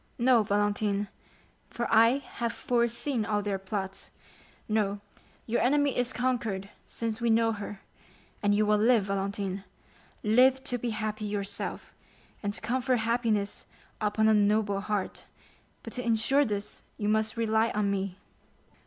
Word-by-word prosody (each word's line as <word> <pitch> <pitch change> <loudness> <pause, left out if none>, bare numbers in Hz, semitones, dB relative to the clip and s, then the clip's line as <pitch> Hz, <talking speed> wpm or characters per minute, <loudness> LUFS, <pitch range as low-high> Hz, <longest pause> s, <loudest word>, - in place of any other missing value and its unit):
"No, 245 -1 +5
Valentine, 205 0 0 0.6
for 235 - -3
I 230 +4 +6
have 235 -4 -4
foreseen 235 +1 0
all 210 -1 0
their 200 -1 -1
plots; 195 0 -5 0.6
no, 205 -2 0 0.5
your 235 - 0
enemy 285 +2 +3
is 245 0 0
conquered 230 -6 -1 0.2
since 230 0 -4
we 235 - +2
know 225 0 +4
her, 205 -1 -6 0.6
and 205 0 +3
you 210 +1 +3
will 210 0 +3
live, 230 -1 +4
Valentine—live 200 +5 0
to 250 -3 -3
be 240 - -2
happy 215 -1 -3
yourself, 205 -1 -4 0.5
and 205 - -1
to - - -6
confer 255 +3 +1
happiness 225 -3 0 0.3
upon 215 +1 +2
a 220 - +5
noble 205 -1 +2
heart; 205 -2 -3 0.6
but - - -8
to 250 - -3
insure 240 +5 +3
this 205 -3 -4 0.2
you 205 - -2
must 220 +1 +1
rely 220 0 +2
on 205 -1 +1
me." 195 -1 -2
215 Hz, 140 wpm, -29 LUFS, 205-235 Hz, 0.6 s, I